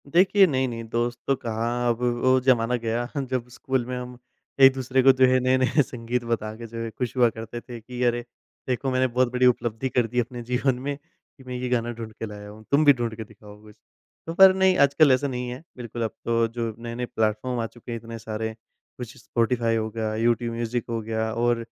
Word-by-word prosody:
देखिए, 190 +4 +5
नहीं-नहीं 130 -5 -1
दोस्त 120 +1 -1
तो 135 - +3
कहाँ 120 +1 -2
अब 115 0 0 0.2
वो 130 0 +5
ज़माना 125 -2 +3
गया 115 +1 -1
जब 130 -3 -2
स्कूल 130 0 -2
में 125 +1 -4
हम 125 0 -7 0.4
एक-दूसरे 130 -1 +5
को 135 - +8
जो 130 0 +4
है 130 - +4
नए-नए 130 +3 +3
संगीत 120 0 -4
बता 115 -2 -2
के 115 0 -8
जो 115 +1 -9
है 115 - -4
खुश 125 +2 -4
हुआ 120 -2 +5
करते 115 +1 -7
थे 120 -1 -9
कि 125 +2 -8
अरे 120 0 +2 0.5
देखो 130 +1 -1
मैंने 130 0 +2
बहुत 125 0 +1
बड़ी 125 0 +2
उपलब्धि 120 0 +1
कर 125 -2 +1
दी 125 +2 -1
अपने 120 +1 -3
जीवन 125 +1 0
में 140 +2 -3
कि 150 -2 -24
मैं 125 -1 -6
ये 125 0 -3
गाना 120 -1 0
ढूँढ 115 -2 -8
के 115 - -6
लाया 105 -1 -9
हूँ, 110 +1 -13
तुम 145 +2 +4
भी 145 - +8
ढूँढ 120 -3 -3
के 110 - -6
दिखाओ 105 -1 -15
कुछ? 105 -1 -16 0.5
तो 165 - -3
पर 190 +2 +8
नहीं 190 -1 +3
आजकल 140 +1 +5
ऐसा 130 +2 +2
नहीं 125 -2 -4
है। 125 +5 -7
बिल्कुल 120 -1 -6
अब 110 - -2
तो 115 0 +2
जो 115 -1 -4
नए-नए 120 +1 -4
प्लेटफॉर्म 110 +2 -1
आ 115 - -1
चुके 120 +1 -12
हैं 115 - -3
इतने 115 +1 -8
सारे 110 0 -4 0.4
कुछ 120 -1 -8
स - - -16
स्पॉटिफाई 115 0 0
हो 110 -1 -1
गया, 110 0 -3
यूट्यूब 115 +1 0
मूज़िक 120 0 -2
हो 115 -1 -1
गया, 110 0 -2
और 120 0 0
120 Hz, 225 wpm, -25 LUFS, 115-130 Hz, 0.5 s, को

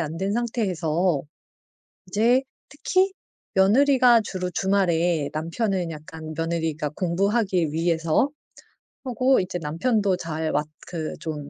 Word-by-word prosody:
안 160 0 -3
된 195 +3 -1
상태에서 185 - 0 0.9
이제 235 +7 +3 0.3
특히 370 +6 +1 0.4
며느리가 245 +4 +5
주로 185 -3 -4
주말에 175 -6 +1
남편은 175 +3 -2
약간 155 +1 -9
며느리가 160 -2 -2
공부하기 185 0 0
위해서 165 - +1 0.8
하고 255 +1 +2
이제 185 -1 -2
남편도 190 +5 +1
잘 160 -2 -3
왔 150 +1 +1 0.2
그 160 -3 -4
좀 150 -3 -5
180 Hz, 240 characters per minute, -24 LUFS, 160-215 Hz, 0.9 s, 며느리가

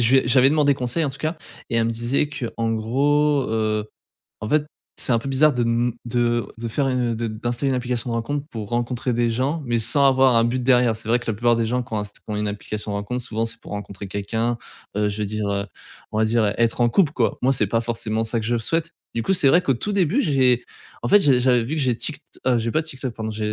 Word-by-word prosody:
je 120 +2 +3
lui 135 - +7
ai 120 - -4
je - - +3
lui 135 - +5
avais 130 +2 +6
demandé 145 -2 +3
conseil 130 +5 -1
en - - 0
tout 135 - -6
cas. 155 +2 -2 0.3
Et 115 - 0
elle 115 - +3
me 115 - 0
disait 120 +5 0
qu'en 115 -5 -3
gros, 140 +6 +2
heu, 110 -1 0 0.6
en 110 - -5
fait, 150 +2 +2 0.3
c'est 125 - +2
un 115 - +3
peu 135 - -5
bizarre 140 +2 +4
de 125 - 0
m 120 +1 +1
de 120 -1 +1
de 115 - -3
faire 135 +4 0
une, 125 -2 0
heu 115 - -2
de 115 +1 -2
d'installer 120 +5 -2
une 130 - +1
application 125 -1 -2
de 115 - -1
rencontres 145 +5 -2
pour 110 -3 -6
rencontrer 120 +1 -1
des 120 0 +1
gens, 140 +7 -1
mais 120 -1 0
sans 115 +6 +3
avoir 130 -2 +5
un 115 - +5
but 120 +2 0
derrière. 125 -2 +3
C'est 110 0 -11
vrai 120 - +4
que 120 - -9
la - - -3
plupart 120 +2 +3
des 115 -1 0
gens 125 +2 0
qui 115 - -9
ont 105 - 0
inst 105 0 -5
qui - - -23
ont 105 - -3
une 105 0 -1
application 105 +1 -5
de 100 - -1
rencontres 120 +5 -4
souvent, 115 -1 -2
c'est - - -6
pour - - -11
rencontrer 100 -1 -6
quelqu'un, 110 +4 -2 0.4
heu, 105 0 +2
je 100 - -4
veux 105 - 0
dire, 105 0 -3
heu, 100 0 -1 0.5
on - - -3
va 110 - +4
dire 110 -2 +2
être 115 +1 +1
en 120 - +4
couple 155 +2 +2
quoi. 120 -6 0
Moi, 130 - +3
c'est 110 -5 +1
pas 115 +3 +1
forcément 115 -1 -1
ça 115 +1 0
que 110 - -5
je 120 +1 +1
souhaite. 165 +8 -1 0.2
Du 115 - -2
coup, 195 - +2
c'est 145 -7 +4
vrai 175 - +5
qu'au 135 - +1
tout 170 - -2
début 200 - +2
j'ai 130 - +2 0.4
en - - 0
fait, 205 - +7
j'ai 135 -6 +4
j'avais 125 -2 +3
vu 135 +7 -3
que 155 - -1
j'ai 125 -3 +1
TikT 155 - -3 0.3
heu, 125 -2 +4
j'ai 115 0 -1
pas 155 - +1
TikTok 130 -5 -6
pardon, 110 -1 -4
j'ai 105 0 -3
120 Hz, 280 wpm, -22 LUFS, 110-135 Hz, 0.6 s, lui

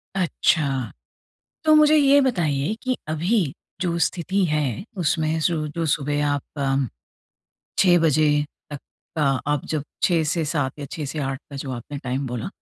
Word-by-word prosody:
अच्छा। 145 - +1 0.7
तो 310 -1 +5
मुझे 305 0 +6
ये 285 -1 +6
बताइए 170 - +1
कि 255 -1 0
अभी 165 - +1 0.3
जो 170 -2 0
स्थिति 185 +4 0
है 150 - -1
उसमें 160 -2 +1
सु 165 +3 +2 0.2
जो 165 -1 -1
सुबह 145 0 0
आप 145 -1 0 0.2
अम, 135 -1 +1 0.9
6 175 -2 +6
बजे 150 -2 +3 0.3
तक 145 - -5 0.4
का 155 - +2 0.3
आप 145 - -1
जब 155 -2 -2 0.2
6 170 -3 +3
से 165 -2 0
7 145 -3 -1
या 145 - -5
6 155 - -4
से 155 - -5
8 135 -2 -2
का 140 - -7
जो 135 0 -5
आपने 130 +4 -6
टाइम 135 0 -3
बोला, 120 +2 -4
155 Hz, 160 wpm, -23 LUFS, 140-175 Hz, 0.9 s, मुझे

